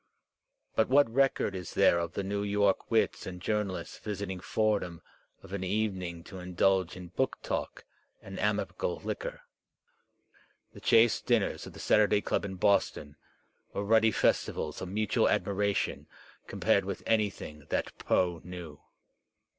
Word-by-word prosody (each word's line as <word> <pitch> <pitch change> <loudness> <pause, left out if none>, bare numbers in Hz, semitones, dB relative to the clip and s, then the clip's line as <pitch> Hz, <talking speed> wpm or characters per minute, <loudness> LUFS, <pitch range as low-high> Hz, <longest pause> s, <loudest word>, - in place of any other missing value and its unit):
But 110 - +2
what 135 -3 +4
record 135 -6 +2
is 90 -2 -6
there 85 - +5
of 85 0 -3
the 100 - -2
New 100 +1 -2
York 100 -1 +1
wits 115 -1 +1
and 90 -1 -6
journalists 105 -1 -2
visiting 100 -3 -4
Fordham 100 -4 -1 0.4
of 95 - -11
an 100 -2 -3
evening 95 -4 -2
to 95 - -9
indulge 90 0 +1
in 90 -1 -9
book 130 +9 -1
talk - - -4 0.3
and - - -9
amicable - - -1
liquor? - - -4 1.3
The - - -12
chaste 115 0 +4
dinners 115 -5 +1
of - - -10
the - - -11
Saturday 105 -1 +4
Club 100 - -1
in 95 -1 -5
Boston 90 -6 +1 0.6
were 100 - -2
ruddy 110 +1 +5
festivals 110 - 0
of 95 - -5
mutual 105 +1 +1
admiration 100 0 0 0.4
com - - -8
pared - - +4
with - - -5
anything 100 -9 -1
that - - -2
Poe 85 -3 +1
knew. 85 -4 -9
100 Hz, 145 wpm, -30 LUFS, 90-110 Hz, 1.3 s, there